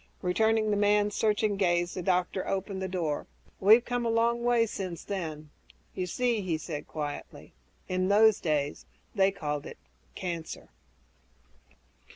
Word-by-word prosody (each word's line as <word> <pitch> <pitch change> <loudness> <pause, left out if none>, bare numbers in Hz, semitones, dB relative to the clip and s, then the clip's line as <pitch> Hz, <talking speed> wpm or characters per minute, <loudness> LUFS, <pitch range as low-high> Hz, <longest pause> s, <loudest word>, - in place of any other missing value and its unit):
Returning 215 +4 +2
the 205 - +1
man's 205 0 +3
searching 210 -1 +1
gaze, 175 -2 +1
the 185 - -4
doctor 180 +1 0
opened 195 0 -2
the 190 - -2
door, 170 -5 -2 0.3
"We've 220 +5 +6
come 245 0 -1
a 230 - 0
long 235 +1 +2
way 240 -1 +3
since 185 -5 -5
then. 155 -6 -5 0.4
You 185 -1 -3
see," 240 +3 0
he 175 -4 -1
said 155 -1 -6
quietly, 145 -2 -6 0.3
"in 185 0 0
those 215 +1 +5
days 150 -3 -1 0.3
they 195 -2 +4
called 150 -6 -4
it - - -10 0.4
'cancer'." 170 -3 -5
190 Hz, 145 wpm, -29 LUFS, 175-215 Hz, 0.4 s, We've